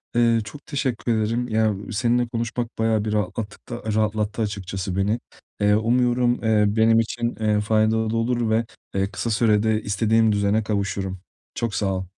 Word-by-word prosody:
Eee, 115 -1 +4
çok 140 +7 -11
teşekkür 125 -4 -1
ederim. 115 +3 -1
Ya 110 -2 +1 0.2
seninle 120 +2 +1
konuşmak 120 0 -3
bayağı 110 -1 +1
bir 105 - -1
rahatlattık 105 +2 -3
da 120 -2 -6
rahatlattı 110 0 0
açıkçası 95 -3 -3
beni. 105 +4 +1 0.4
Eee, 105 0 +4
umuyorum, 120 +2 +2
eee, 110 -2 +3
benim 110 +2 +4
için, 120 +1 -2
eee, 105 -1 +2
faydalı 110 +1 +1
olur 120 0 0
ve, 115 +1 +2 0.3
eee, 95 +1 0
kısa 115 - -3
sürede 110 0 +2
istediğim 110 +2 +2
düzene 100 +1 +1
kavuşurum. 100 -3 -2 0.4
Çok 115 -3 -2
sağ 95 -2 0
ol. 95 - -3
110 Hz, 155 wpm, -23 LUFS, 105-115 Hz, 0.4 s, Eee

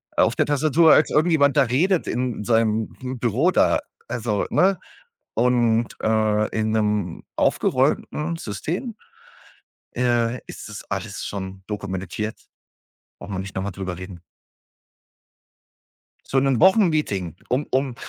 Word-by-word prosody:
auf - - +3
der - - +2
Tastatur, 155 +3 +4
als 155 - +4
irgendjemand 150 -2 +3
da 140 - +6
redet 160 - +1
in 125 -3 -2
seinem 110 -1 +1 0.3
Büro 125 - +2
da, - - +3 0.3
also, 110 -4 -1
ne, 190 +1 +3 0.6
und, 120 -2 +2
äh, 110 -1 +2
in 110 0 0
'nem 105 -5 -1
aufgeräumten 165 +2 0
System, 170 - -4 1.0
äh, 120 -1 +1
ist - - -9
das - - -8
alles - - -4
schon 95 -1 -6
dokumentiert. 100 +1 -4 0.8
Brauchen 100 0 -7
wir - - -3
nicht 95 +1 -7
noch 95 - -2
mal 100 - -3
drüber 95 -1 -5
reden. 90 -1 -9 2.1
So 135 - +2
'nen 135 -2 +1
Wochenmeeting, 155 - +3
um 135 +4 0
um 130 -2 0
115 Hz, 125 wpm, -23 LUFS, 105-145 Hz, 2.1 s, da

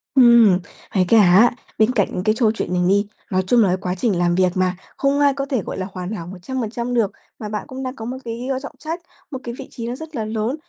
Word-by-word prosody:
Ừm. 235 -7 +7 0.4
Với 185 -2 +4
cả 230 - +5
á, 195 +5 +6 0.3
bên 220 +2 +4
cạnh 210 -6 +2
những 180 - -2
cái 215 +1 +2
châu 225 -3 +3
chuyện 215 -4 -3
này 180 - +1
đi, 200 +1 +3 0.2
nói 185 0 +2
chung 240 +1 +5
là - - +3
cái 180 - +1
quá 180 0 -2
trình 205 -3 +1
làm 175 0 +2
việc 185 -1 +3
mà, 185 -1 +1 0.2
không 275 +1 +1
ai 285 -1 +4
có 275 0 -3
thể 260 -6 -1
gọi - - -6
là 190 0 -3
hoàn 185 +1 -5
hảo 170 -6 -5
100% 235 +5 -4
được. 225 -5 +2 0.3
Mà 210 -2 -5
bạn 210 -1 -3
cũng 265 -2 -6
đang 255 0 -4
có 225 - -7
một 250 +3 -4
cái, 235 +2 -5
ơ, 265 -1 -1
trọng 280 - -8
trách, 325 +3 -4 0.3
một 265 - -4
cái 235 0 -5
vị 270 - -7
trí 230 -1 -6
nó 245 - -3
rất 320 +2 -9
là 220 -3 -2
lớn, 220 +4 -2
225 Hz, 275 wpm, -21 LUFS, 190-255 Hz, 0.4 s, Ừm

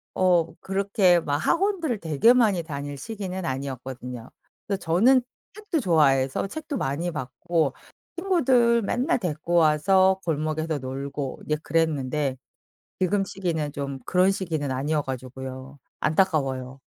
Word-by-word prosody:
어 175 -3 +3
그렇게 195 -2 +3
막 145 -1 -1
학원들을 335 - 0
되게 165 - +4
많이 215 -8 +3
다닐 145 -2 -5
시기는 190 0 -5
아니었거든요. 130 -2 -5 0.4
근데 200 -1 0
저는 230 +11 +4 0.3
책도 415 -7 -2
좋아해서 135 - +2
책도 295 +5 -5
많이 145 +4 -2
봤고 150 +2 -1 0.4
친구들 255 -11 +3
맨날 255 +10 +1
데리고 170 -2 -2
와서 185 +4 +4
골목에서 155 0 -1
놀고 135 +1 -5
이제 150 - +1
그랬는데 150 -4 0 0.6
지금 195 +2 +2
시기는 165 -7 -3
좀 140 -1 -4
그런 185 +1 +3
시기는 160 -8 -3
아니어 145 +3 0
가지고요. 130 +1 -7 0.2
안타까워요. 135 -6 0
160 Hz, 300 characters per minute, -25 LUFS, 140-195 Hz, 0.6 s, 되게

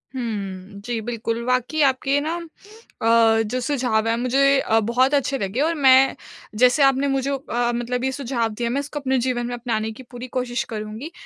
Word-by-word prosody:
हुँ, 200 -5 -5
जी, 240 -2 -2
बिल्कुल 230 0 -3
वाक़ई 255 +5 0
आपके 270 +1 +2
ना 320 +3 -2 0.7
अ, 225 0 +4
जो 225 +4 -2
सुझाव 240 -5 0
है 230 - +2
मुझे 270 +3 +3
अ, 225 -3 +2
बहुत 245 +5 +1
अच्छे 280 -1 +1
लगे 200 +5 -2
और 330 +2 +2
मैं 270 -2 +5 0.5
जैसे 250 +3 +5
आपने 270 +1 +3
मुझे 270 0 0
अ, 245 -3 -1
मतलब 245 +1 -2
ये 265 - 0
सुझाव 245 -4 -2
दिए 235 +2 -2
मैं 270 - -1
इसको 295 +1 -6
अपने 265 -1 0
जीवन 240 -2 -1
में 245 - -4
अपनाने 225 -2 -2
की 230 +4 -11
पूरी 245 +1 -7
कोशिश 245 -1 -1
करुँगी 215 +9 -6
245 Hz, 185 wpm, -22 LUFS, 230-270 Hz, 0.7 s, मैं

